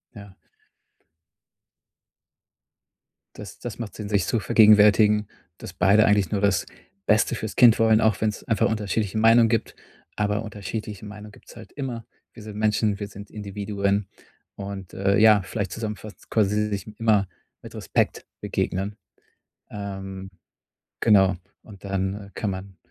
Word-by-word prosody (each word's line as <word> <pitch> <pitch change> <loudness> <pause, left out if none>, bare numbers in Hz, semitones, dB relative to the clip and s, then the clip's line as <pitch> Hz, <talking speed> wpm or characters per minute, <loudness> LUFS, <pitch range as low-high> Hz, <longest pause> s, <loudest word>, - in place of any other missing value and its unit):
Ja. 100 -2 -12 3.0
Das - - -10
das - - -7
macht 115 -3 -6
Sinn, 105 -1 -7
sich 100 -3 +1
zu 115 - 0
vergegenwärtigen, 105 0 +5 0.3
dass 90 - -9
beide 100 +4 +4
eigentlich 100 -2 +2
nur 100 -2 -1
das 100 -3 +2 0.4
Beste 110 +2 +3
fürs 110 -3 -5
Kind 120 -3 +6
wollen, 110 -1 +4
auch 110 -3 +1
wenn's 105 -1 -1
einfach 115 -4 +1
unterschiedliche 105 -1 -2
Meinungen 115 +1 +5
gibt. 115 -2 -1 0.4
Aber 105 +1 -1
unterschiedliche 105 -1 -6
Meinungen 105 0 -10
gibt's - - -17
halt 115 -2 -12
immer. 125 -5 -5 0.3
Wir 115 - -12
sind 105 -1 -9
Menschen, 105 -1 +1
wir 100 - -4
sind 100 0 -11
Individuen 100 -1 -2 0.5
und, 100 -2 -8
äh, 100 0 +1
ja, 110 -2 +6
vielleicht 95 +1 -4
zusammenfassend 110 -2 -7
quasi 105 0 +1
sich 100 0 -4
immer 105 -4 +2 0.4
mit - - -11
Respekt - - -1 0.2
begegnen. 95 +3 -2 0.8
Ähm, 95 -2 -7 0.7
genau. 95 -4 +4 0.3
Und 100 -3 -15
dann 100 +1 -3
kann 105 - -3
man 95 0 -7
105 Hz, 135 wpm, -24 LUFS, 100-110 Hz, 3.0 s, Kind